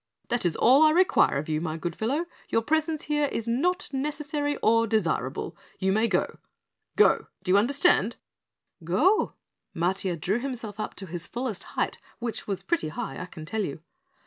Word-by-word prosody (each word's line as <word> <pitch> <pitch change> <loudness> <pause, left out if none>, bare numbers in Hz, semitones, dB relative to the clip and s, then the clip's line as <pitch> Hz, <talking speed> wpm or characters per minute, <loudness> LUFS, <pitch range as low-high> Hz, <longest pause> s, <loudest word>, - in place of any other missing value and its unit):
That 240 -6 +1
is 165 - -2
all 260 +5 +5
I 310 - +7
require 365 - +4
of 145 - -3
you, 155 -1 -1
my 160 -1 -3
good 170 0 -4
fellow, 275 +10 -1 0.2
your 225 - +1
presence 315 +2 0
here 295 -1 +1
is 230 - -2
not 345 +11 +1
necessary 290 +1 -1
or 230 +1 +4
desirable. 170 - -1 0.2
You 190 0 +1
may 220 +3 +3
go. - - -1 0.6
GO, - - +4 0.2
do 185 - 0
you 195 - +6
understand?" 245 - +3 0.7
"Go?" 260 - +3 0.4
Matiah 180 0 0
drew 195 +9 0
himself 235 -5 -5
up - - -4
to 195 - -6
his 175 -1 -6
fullest 240 -5 -4
height, - - 0 0.2
which 235 -2 -5
was 195 -2 -3
pretty 335 - 0
high, 220 +7 -5
I - - -6
can 155 -3 -10
tell 215 +6 -2
you. 150 -3 -5
225 Hz, 175 wpm, -27 LUFS, 180-290 Hz, 0.7 s, I